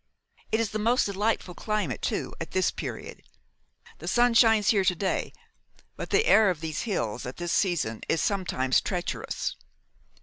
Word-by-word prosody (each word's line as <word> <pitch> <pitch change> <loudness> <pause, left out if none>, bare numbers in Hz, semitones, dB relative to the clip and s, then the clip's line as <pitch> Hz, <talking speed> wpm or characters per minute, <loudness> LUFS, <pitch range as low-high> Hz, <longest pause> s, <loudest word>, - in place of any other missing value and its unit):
It 220 - +2
is 230 -3 0
the 215 - -2
most 235 +4 +2
delightful 200 -2 -1
climate, 205 - -2
too, - - -2
at - - -6
this 185 -1 +2
period. - - -7 0.8
The - - -8
sun 240 0 +3
shines 225 -3 +5
here 200 -3 +4
to 185 -1 +2
day, 190 +2 -1 0.6
but - - -6
the 450 - +3
air 220 - +6
of 175 -4 -1
these 160 -1 -3
hills 120 - -2
at 125 - -7
this 175 -1 -2
season 150 - 0
is 165 - +2
sometimes 175 -11 +1
treacherous. 180 -2 -3
190 Hz, 165 wpm, -27 LUFS, 165-215 Hz, 0.8 s, air